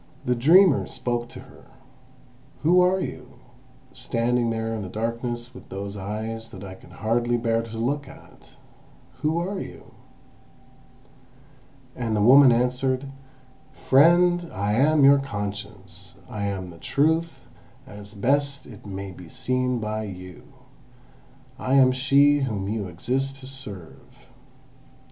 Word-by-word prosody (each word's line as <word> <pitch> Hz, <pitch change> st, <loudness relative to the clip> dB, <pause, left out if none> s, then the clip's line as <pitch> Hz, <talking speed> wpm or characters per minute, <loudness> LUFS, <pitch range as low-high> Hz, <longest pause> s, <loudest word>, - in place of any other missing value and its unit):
The 125 Hz, -, +2 dB
dreamer 160 Hz, +7 st, +5 dB
spoke 120 Hz, -1 st, -3 dB
to -, -, -10 dB
her: -, -, -17 dB, 1.0 s
"Who 175 Hz, +4 st, +5 dB
are 185 Hz, +1 st, +3 dB
you, -, -, -6 dB, 0.6 s
standing 120 Hz, -1 st, 0 dB
there 115 Hz, 0 st, -2 dB
in 110 Hz, -, -4 dB
the 95 Hz, -, -6 dB
darkness 120 Hz, +3 st, -4 dB
with 125 Hz, -, -13 dB
those 100 Hz, +1 st, -6 dB
eyes 110 Hz, +3 st, -5 dB
that 95 Hz, -, -10 dB
I 95 Hz, -1 st, -8 dB
can 95 Hz, -, -16 dB
hardly 120 Hz, +2 st, 0 dB
bear 115 Hz, -1 st, 0 dB
to 115 Hz, -1 st, -8 dB
look 140 Hz, +5 st, -2 dB
at? -, -, -17 dB, 0.7 s
Who 155 Hz, +2 st, +1 dB
are 190 Hz, +3 st, -2 dB
you?" -, -, -10 dB, 2.0 s
And 115 Hz, -3 st, -2 dB
the 105 Hz, -, +1 dB
woman 130 Hz, +3 st, +8 dB
answered: 130 Hz, +3 st, 0 dB, 0.6 s
"Friend, 175 Hz, +4 st, +4 dB
I 100 Hz, +2 st, -1 dB
am 145 Hz, +5 st, +3 dB
your 140 Hz, +1 st, +7 dB
Conscience; 100 Hz, -6 st, -7 dB
I 105 Hz, -1 st, -4 dB
am 95 Hz, -3 st, -4 dB
the 85 Hz, -, -14 dB
Truth 160 Hz, -, 0 dB, 0.4 s
as 100 Hz, 0 st, -11 dB
best 140 Hz, +6 st, 0 dB
it 110 Hz, -4 st, -13 dB
may 100 Hz, 0 st, -6 dB
be 90 Hz, -2 st, -12 dB
seen 125 Hz, +3 st, -1 dB
by 110 Hz, -1 st, -3 dB
you. 90 Hz, -2 st, -10 dB, 1.1 s
I 130 Hz, +1 st, 0 dB
am 130 Hz, -2 st, +6 dB
she 140 Hz, +3 st, +4 dB
whom 110 Hz, -8 st, -2 dB
you 105 Hz, -1 st, -3 dB
exist 130 Hz, +10 st, -2 dB
to -, -, -10 dB
serve." 105 Hz, -11 st, -10 dB
120 Hz, 135 wpm, -24 LUFS, 105-135 Hz, 2.0 s, woman